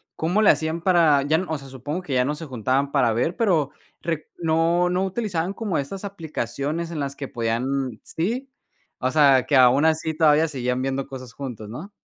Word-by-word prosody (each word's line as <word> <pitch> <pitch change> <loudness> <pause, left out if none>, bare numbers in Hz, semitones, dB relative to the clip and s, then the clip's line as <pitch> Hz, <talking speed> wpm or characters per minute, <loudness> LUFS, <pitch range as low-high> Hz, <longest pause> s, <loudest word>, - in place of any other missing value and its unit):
cómo 180 +7 +1
le - - +8
hacían 160 +1 -2
para 165 -6 +4
ya, 160 +5 +1
o 160 - -1
sea, 135 -1 -11
supongo 145 +7 -5
que 140 - -4
ya 125 0 +3
no 150 +3 -1
se 160 +1 -7
juntaban 130 +2 -1
para 125 -6 +3
ver, 125 +10 0
pero 170 - +1 0.3
re 165 -2 -3
no 170 +2 +2
no 185 +2 +1
utilizaban 190 -3 -2
como 205 -5 -2
esas 195 +8 -5
aplicaciones 160 - -4
en 155 - -4
las 140 0 -3
que 140 - -6
podían 120 +1 -2
sí, 245 +11 -3 0.5
o 130 - 0
sea, 140 -4 +5
que 145 - +2
aun 130 +4 +6
así 160 0 +1
todavía 155 0 +4
seguían 125 -3 -2
viendo 135 0 -2
cosas 130 -3 -9
juntos, 120 -6 -7
¿no? 155 - -8
150 Hz, 195 wpm, -23 LUFS, 130-170 Hz, 0.5 s, le